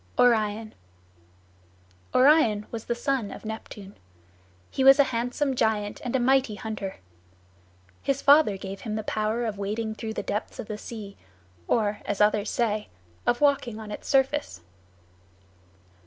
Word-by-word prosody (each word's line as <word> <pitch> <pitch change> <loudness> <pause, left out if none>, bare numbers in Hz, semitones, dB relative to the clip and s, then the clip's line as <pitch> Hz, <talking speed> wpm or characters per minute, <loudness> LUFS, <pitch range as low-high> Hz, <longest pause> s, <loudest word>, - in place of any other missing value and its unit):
ORION 220 -2 +2 1.4
Orion 255 -7 +5
was 225 -1 -6
the 235 - -1
son 255 -3 -1
of - - -10
Neptune. 210 -2 -8 0.8
He 265 - 0
was 270 +1 +8
a 285 - +7
handsome 245 +4 -1
giant 215 -3 0
and 250 0 -2
a - - +3
mighty 260 -2 +2
hunter. 210 -4 -5 1.1
His 275 -1 0
father 285 -9 +5
gave 195 0 -7
him 215 -2 -4
the 215 - -3
power 215 +3 -1
of 210 -3 -4
wading 220 +2 -2
through 220 0 -6
the - - -3
depths 210 - -4
of 250 - -5
the 215 - -5
sea, 210 -4 -8 0.5
or, 210 -2 +1
as 205 - -3
others 210 0 +3
say, 215 -3 -1 0.4
of 240 +2 +2
walking 270 -6 +2
on 215 -1 -8
its - - -7
surface. 270 - +1
220 Hz, 145 wpm, -26 LUFS, 210-255 Hz, 1.4 s, was